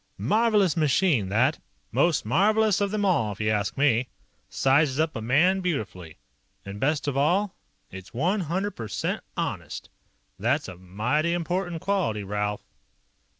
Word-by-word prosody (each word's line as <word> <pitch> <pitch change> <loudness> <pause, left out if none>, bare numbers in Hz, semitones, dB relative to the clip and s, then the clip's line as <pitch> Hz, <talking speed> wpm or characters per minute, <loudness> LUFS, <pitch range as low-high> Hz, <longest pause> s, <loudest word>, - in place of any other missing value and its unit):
"Marvelous 210 -6 +2
machine, 150 - +2
that. 125 +9 +2 0.3
Most 170 -9 +2
marvelous 210 - +3
of 200 -1 0
'em 210 -1 0
all, 115 - +1
if 100 - -16
you 110 0 +1
ask 105 +3 -1
me. 130 -3 +2 0.4
Sizes 135 +1 +2
up 160 0 0
a 115 - -4
man 160 +12 +3
beautifully. 100 - -4 0.5
And 100 +1 -7
best 145 +3 0
of 140 - -1
all, 180 +9 +2 0.4
it's 95 0 -10
one 175 - 0
hundred 190 +4 -2
percent 110 - -4
honest. - - -4 0.5
That's - - 0
a 90 - -8
mighty 115 - -1
important 175 0 -2
quality, 180 - 0
Ralph." 105 +1 -3
150 Hz, 145 wpm, -26 LUFS, -, 0.5 s, marvelous